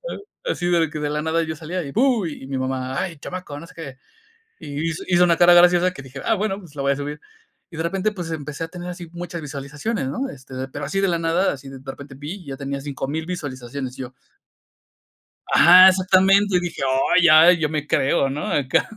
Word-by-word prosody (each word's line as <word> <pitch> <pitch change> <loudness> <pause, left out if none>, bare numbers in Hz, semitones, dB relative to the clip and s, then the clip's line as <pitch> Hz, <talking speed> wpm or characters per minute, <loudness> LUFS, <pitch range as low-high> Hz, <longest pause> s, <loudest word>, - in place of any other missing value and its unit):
ah, - - -5 0.4
así 175 - -3
de 165 -2 +2
que 155 - -6
de 150 0 -2
la 150 0 -1
nada 165 +1 0
yo 160 -1 -3
salía 170 +3 -4
y 140 -2 -7
¡bu!, 245 -5 +2
y 145 -4 -7
mi 135 -1 -4
mamá: 130 0 -3
"ay 170 -5 -4
chamaco, 165 -4 -7
no 170 - -10
sé - - -17
qué", 140 -6 -9 0.6
y 150 +3 -3
hizo 165 +4 -6
hizo 180 0 +4
una 170 -2 +3
cara 175 0 +7
graciosa 175 +1 +5
que 135 - -10
dije, 135 0 -10
ah, 225 - +2
bueno, 200 -1 -2
pues, 165 -6 -15
la 140 - -3
voy 140 0 +2
a - - -1
subir, 145 +1 -6 0.5
y 165 - -10
de 160 - -2
repente, 195 +5 -1
pues, 175 -5 -6
empecé 150 0 -5
a 165 - -7
tener 175 0 -8
así 175 -1 -7
muchas 175 -1 -6
visualizaciones, 145 - -4
¿no?, 265 - -3
este, 130 -1 -12 0.2
pero 145 0 -5
así 195 +7 -1
de 195 - +2
la 170 -1 0
nada, 165 +3 +1
así 135 -1 -9
de 135 -1 -9
repente 135 +1 -9
vi 145 +6 -6
y 180 -6 -12
ya 135 -1 -6
tenía 140 0 -4
5000 145 +2 -4
visualizaciones, 130 -6 -6
y - - -4
yo 125 0 -9 1.4
Ajá, 185 +2 +9
exactamente, 190 +1 +3
y - - +2
dije: 175 -4 -5 0.3
"Ay, 175 -2 +6
ay, 165 +2 +7
yo 150 -2 0
me 150 -1 -3
creo, 135 0 +2
¿no?, 145 +3 -4
acá", 130 -3 +1
160 Hz, 230 wpm, -22 LUFS, 140-180 Hz, 1.4 s, Ajá